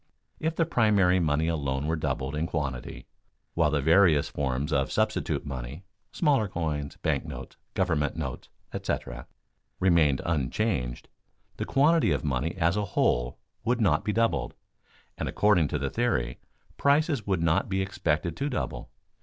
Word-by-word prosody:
If 160 +1 -1
the 165 - +2
primary 105 - +3
money 80 -1 +1
alone 70 -4 -1
were 80 +1 0
doubled 70 -3 -2
in 80 +2 -1
quantity, 70 -7 -4 0.5
while 85 -2 +3
the 75 -1 +1
various 80 -2 +5
forms 70 +2 -2
of 70 -1 +1
substitute - - 0
money 70 +5 -6 0.3
(smaller 140 - +2
coins, 75 -5 -3
bank - - +1
notes, - - -8 0.2
government 80 -6 +1
notes, 65 -6 -5 0.2
etc.) 60 -2 -4 0.5
remained 85 -7 +4
unchanged, 75 - -1 0.5
the - - -2
quantity 155 - +3
of 70 - 0
money 70 +3 -1
as 85 -1 +2
a 105 -1 0
whole - - +2 0.3
would 120 +2 +1
not 90 -9 +2
be 105 - 0
doubled, 115 +2 0 0.6
and - - -2
according 105 -7 +3
to 75 - -2
the 70 -1 -2
theory, 65 - 0 0.4
prices 140 -5 +2
would 95 -4 +1
not 80 +3 +2
be 95 0 0
expected 85 -3 -1
to 140 +2 -1
double. 130 - -4
80 Hz, 150 wpm, -27 LUFS, 70-105 Hz, 0.6 s, various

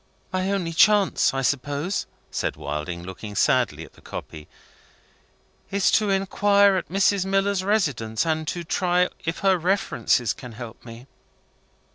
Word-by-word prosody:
"My 185 +1 0
only 180 -4 -2
chance, 205 +3 +4
I 135 0 -2
suppose," 145 +7 -1 0.2
said - - -2
Wilding, 75 +4 -5
looking 95 +3 -8
sadly - - +1
at - - -19
the - - -20
copy, 75 -1 -8 1.2
"is 200 -1 +2
to 215 -2 +2
inquire 200 +1 +3
at 185 - -3
Mrs. 195 +1 +2
Miller's 195 0 0
residence, 145 - 0
and 160 -1 -1
to 175 +2 -3
try 180 +1 +1 0.2
if 165 +1 -3
her 190 -2 +4
references 170 - +1
can 125 -2 -10
help 115 0 -9
me?" 115 +1 -11
175 Hz, 140 wpm, -24 LUFS, 120-195 Hz, 1.2 s, chance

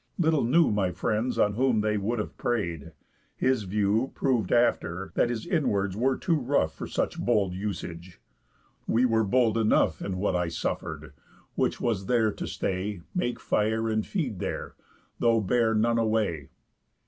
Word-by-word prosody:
Little 160 -5 +2
knew 150 +5 +4
My 100 -3 +1
friends 110 +7 -1
on 105 - +3
whom 120 -1 +2
they 105 0 0
would 105 +4 -1
have 105 - -4
prey'd. 85 -11 -2 0.4
His 130 -5 +1
view 105 +5 +1
Prov'd 120 -8 0
after, 95 -6 +1
that 120 - +2
his 120 -2 -3
inwards 105 - 0
were 130 +4 +1
too 170 -4 +1
rough 125 - +1
For - - -7
such - - -2
bold 105 -6 +1
usage. 90 -3 -6 0.7
We 120 +3 +3
were 115 -2 +2
bold 115 +1 +2
enough 105 -7 +2
In 95 -2 -3
what 95 -1 0
I 90 -1 0
suffer'd; 85 - -4 0.4
which - - 0
was 105 -6 -1
there 115 -3 +3
to - - -6
stay, 95 0 -3
Make 125 -10 -1
fire 110 +1 0
and 110 0 0
feed 130 - -3
there, 95 - -4 0.5
though 115 -1 +3
bear 110 +2 +2
none 115 +2 +2
away. 110 -10 0
110 Hz, 160 wpm, -27 LUFS, 95-120 Hz, 0.7 s, knew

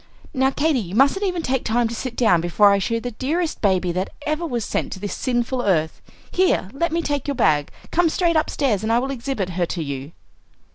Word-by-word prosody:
"Now, 265 -1 +3
Katy, 290 0 +1
you 190 -3 -5
mustn't 280 - +3
even 355 -3 -2
take 265 -2 0
time 235 +1 +1
to 230 - -5
sit 240 +1 -5
down 215 -10 +3
before 200 +4 +4
I 200 - +3
show 230 +4 -1
you - - 0
the 245 +1 -5
dearest 315 +8 -2
baby 185 -3 +2
that 185 +2 -2 0.2
ever 310 +3 -1
was 240 -6 -2
sent - - -2
to 190 - -8
this 205 -1 -4
sinful 245 0 -1
earth. 160 -7 0 0.3
Here, 360 - +1
let 335 +4 -1
me 335 +1 0
take 290 -2 -2
your 285 - -1
bag; 145 - +2 0.2
come 345 0 +3
straight 335 +1 +1
upstairs, 275 -9 +1
and 220 +1 -1
I 230 - +4
will 265 +3 -1
exhibit 240 -7 -3
her 175 -1 -1
to 165 -2 -3
you." 140 +1 -6
240 Hz, 230 wpm, -22 LUFS, 190-285 Hz, 0.3 s, before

